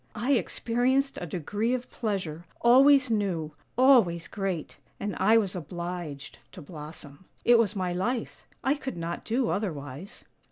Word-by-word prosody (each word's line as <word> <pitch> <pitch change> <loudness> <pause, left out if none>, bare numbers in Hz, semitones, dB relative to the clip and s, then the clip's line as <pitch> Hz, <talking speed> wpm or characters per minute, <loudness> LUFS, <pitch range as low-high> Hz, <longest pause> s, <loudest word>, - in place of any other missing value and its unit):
I 240 +5 -1
experienced 260 +2 +1
a 175 - -4
degree 205 - -1
of 250 0 -5
pleasure, 185 -8 -3 0.2
always 265 +1 +6
new, 185 -8 -1 0.3
always 230 -11 +5
great, 195 -6 -4 0.2
and 205 -1 -3
I 215 +4 +5
was 200 -5 0
obliged 170 -3 -6
to 185 - -9
blossom. 150 0 -10 0.2
It 240 -1 +6
was 215 -2 +2
my 185 -2 -1
life; 225 +7 -3 0.2
I 265 +3 +3
could 270 -7 -5
not 170 +1 -4
do 235 +1 0
otherwise." 155 - -5
200 Hz, 145 wpm, -28 LUFS, 170-240 Hz, 0.3 s, always